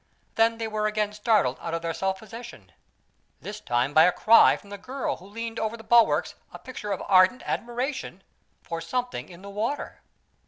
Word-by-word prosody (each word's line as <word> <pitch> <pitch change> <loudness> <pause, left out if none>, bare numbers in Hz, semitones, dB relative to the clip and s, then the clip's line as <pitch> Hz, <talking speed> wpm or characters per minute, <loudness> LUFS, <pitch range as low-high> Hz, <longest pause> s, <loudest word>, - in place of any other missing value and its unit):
Then 225 0 +3
they 225 -1 -3
were 215 -1 -1
again 210 -1 -1
startled 210 - +1
out 165 0 -3
of 165 - -4
their 165 0 -2
self 190 +3 -1
possession 230 +3 -11 0.7
this 210 +1 -7
time 125 -3 0
by 160 +2 +7
a 180 - +4
cry 230 +5 +6
from 200 - -17
the 200 - -7
girl 260 +6 -3
who 185 - -15
leaned 230 +2 -5
over 220 +1 -2
the 225 - -12
bulwarks 235 0 +4 0.2
a - - -9
picture 245 -5 -7
of 195 - -2
ardent 185 +7 +4
admiration 240 -5 -4 0.4
for 165 0 -5
something 250 +8 -3
in 175 +1 -13
the 200 - -8
water. 225 +8 -3
215 Hz, 190 wpm, -26 LUFS, 185-230 Hz, 0.7 s, by